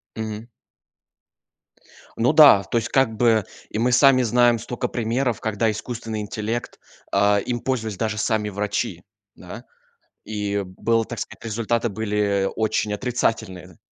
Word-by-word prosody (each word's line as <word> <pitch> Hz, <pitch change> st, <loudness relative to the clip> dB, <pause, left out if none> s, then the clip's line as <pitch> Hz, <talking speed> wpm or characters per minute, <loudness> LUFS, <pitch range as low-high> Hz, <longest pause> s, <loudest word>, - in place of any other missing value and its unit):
Мгм. 110 Hz, 0 st, -5 dB, 1.7 s
Ну -, -, +3 dB
да, 100 Hz, -, +8 dB
то 115 Hz, -, -2 dB
есть, 115 Hz, -, -1 dB
как 130 Hz, -5 st, +2 dB
бы, 115 Hz, -2 st, +3 dB, 0.3 s
и -, -, -5 dB
мы 120 Hz, +3 st, +1 dB
сами 130 Hz, +1 st, +5 dB
знаем 120 Hz, 0 st, +3 dB
стока 120 Hz, +2 st, -4 dB
примеров, 120 Hz, +1 st, -1 dB
когда 110 Hz, +1 st, 0 dB
искусственный 110 Hz, 0 st, -5 dB
интеллект 110 Hz, +3 st, -4 dB, 0.3 s
а, 100 Hz, +1 st, +3 dB
им 120 Hz, +4 st, -3 dB
пользовались 110 Hz, -6 st, -3 dB
даже 110 Hz, -1 st, -2 dB
сами 110 Hz, -1 st, 0 dB
врачи, 105 Hz, +1 st, -3 dB, 0.3 s
да. -, -, -10 dB, 0.6 s
И 105 Hz, -1 st, -2 dB
было 115 Hz, +5 st, 0 dB
так 120 Hz, +1 st, -8 dB
сказать, -, -, -8 dB
результаты 115 Hz, +1 st, -1 dB
были 100 Hz, -2 st, 0 dB
очень 110 Hz, -1 st, 0 dB
отрицательные. 105 Hz, -6 st, -2 dB
110 Hz, 135 wpm, -22 LUFS, 105-120 Hz, 1.7 s, да